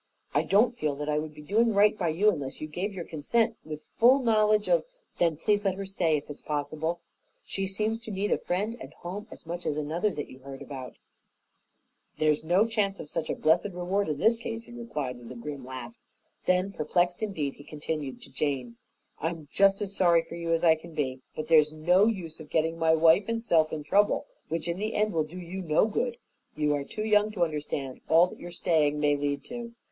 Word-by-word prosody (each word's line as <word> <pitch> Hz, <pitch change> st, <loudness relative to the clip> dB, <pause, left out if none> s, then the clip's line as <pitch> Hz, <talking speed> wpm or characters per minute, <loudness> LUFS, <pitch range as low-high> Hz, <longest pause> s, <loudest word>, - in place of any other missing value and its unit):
I -, -, +4 dB
don't 225 Hz, +5 st, +3 dB
feel 150 Hz, -10 st, -1 dB
that 150 Hz, +1 st, -4 dB
I 150 Hz, 0 st, +2 dB
would 155 Hz, 0 st, -6 dB
be 150 Hz, -, -11 dB
doing 220 Hz, +6 st, +2 dB
right 205 Hz, +1 st, +5 dB
by 180 Hz, -5 st, -1 dB
you 190 Hz, +7 st, +4 dB
unless 140 Hz, -7 st, -5 dB
you -, -, -4 dB
gave 180 Hz, +7 st, -3 dB
your 180 Hz, -4 st, -6 dB
consent 225 Hz, +9 st, 0 dB
with 155 Hz, -1 st, -7 dB, 0.2 s
full 245 Hz, +4 st, +7 dB
knowledge 215 Hz, -4 st, +3 dB
of -, -, +3 dB, 0.2 s
" -, -, -43 dB
"Then 165 Hz, -3 st, +2 dB
please 205 Hz, +5 st, +1 dB
let 195 Hz, -2 st, +1 dB
her 195 Hz, 0 st, -5 dB
stay, 175 Hz, -5 st, +1 dB
if 145 Hz, -, -7 dB
it 145 Hz, -, -5 dB
is -, -, -19 dB
possible. 155 Hz, +3 st, -2 dB, 0.4 s
She 195 Hz, 0 st, -3 dB
seems 215 Hz, +4 st, -1 dB
to 230 Hz, -, -10 dB
need 200 Hz, +1 st, -1 dB
a -, -, +2 dB
friend 205 Hz, +6 st, -1 dB
and -, -, -9 dB
home 200 Hz, +5 st, -7 dB
as -, -, -13 dB
much 170 Hz, +1 st, -5 dB
as 150 Hz, -, -1 dB
another 160 Hz, +7 st, 0 dB
that 150 Hz, -7 st, -5 dB
you 130 Hz, -, -13 dB
heard 135 Hz, 0 st, -9 dB
about." 130 Hz, -3 st, -8 dB, 1.2 s
"There's 155 Hz, -1 st, +2 dB
no 180 Hz, +6 st, +4 dB
chance 210 Hz, -4 st, 0 dB
of 150 Hz, -, -8 dB
such 160 Hz, -2 st, -3 dB
a -, -, 0 dB
blessed 170 Hz, +5 st, +2 dB
reward 180 Hz, +2 st, -1 dB
in 150 Hz, -, -1 dB
this 225 Hz, +8 st, +3 dB
case," 230 Hz, 0 st, -5 dB
he -, -, -14 dB
replied, 150 Hz, -, -4 dB
with 120 Hz, 0 st, -11 dB
a -, -, -7 dB
grim 140 Hz, +3 st, -6 dB
laugh. 130 Hz, -, -8 dB, 0.5 s
Then, 185 Hz, +2 st, +2 dB
perplexed 175 Hz, +1 st, 0 dB
indeed, 165 Hz, -10 st, -2 dB
he 145 Hz, -, -12 dB
continued 150 Hz, -2 st, -5 dB
to -, -, -15 dB
Jane, 130 Hz, -6 st, -2 dB, 0.4 s
"I'm 160 Hz, -2 st, -4 dB
just 195 Hz, +1 st, +4 dB
as 200 Hz, -1 st, -6 dB
sorry 170 Hz, -3 st, +4 dB
for 165 Hz, -, -11 dB
you 170 Hz, -1 st, -3 dB
as 165 Hz, 0 st, +2 dB
I 165 Hz, -2 st, +7 dB
can 160 Hz, +1 st, -9 dB
be, 130 Hz, -4 st, -2 dB
but 155 Hz, -, -3 dB
there's 155 Hz, -2 st, +5 dB
no 175 Hz, +6 st, +4 dB
use 180 Hz, -8 st, -3 dB
of 155 Hz, -2 st, -11 dB
getting 165 Hz, +1 st, 0 dB
my 160 Hz, 0 st, +4 dB
wife 165 Hz, +4 st, +5 dB
and 230 Hz, 0 st, -2 dB
self 160 Hz, -5 st, +3 dB
in 155 Hz, -1 st, -4 dB
trouble 205 Hz, +7 st, +3 dB, 0.2 s
which 165 Hz, 0 st, -2 dB
in 170 Hz, 0 st, -1 dB
the 215 Hz, +1 st, -2 dB
end 210 Hz, -1 st, +1 dB
will 160 Hz, -2 st, +1 dB
do 165 Hz, +4 st, -10 dB
you 180 Hz, +2 st, -6 dB
no 160 Hz, +1 st, +3 dB
good. 235 Hz, +2 st, -1 dB, 0.4 s
You 150 Hz, -1 st, +1 dB
are 145 Hz, -1 st, -1 dB
too 215 Hz, +9 st, -5 dB
young 210 Hz, -1 st, +4 dB
to 180 Hz, -5 st, +1 dB
understand 145 Hz, -4 st, -3 dB
all 165 Hz, +2 st, +7 dB
that 180 Hz, -, -10 dB
your 175 Hz, -, -7 dB
staying 155 Hz, -4 st, +1 dB
may 145 Hz, -1 st, +3 dB
lead 145 Hz, 0 st, -2 dB
to." 235 Hz, -1 st, -7 dB
170 Hz, 230 wpm, -28 LUFS, 150-205 Hz, 1.2 s, full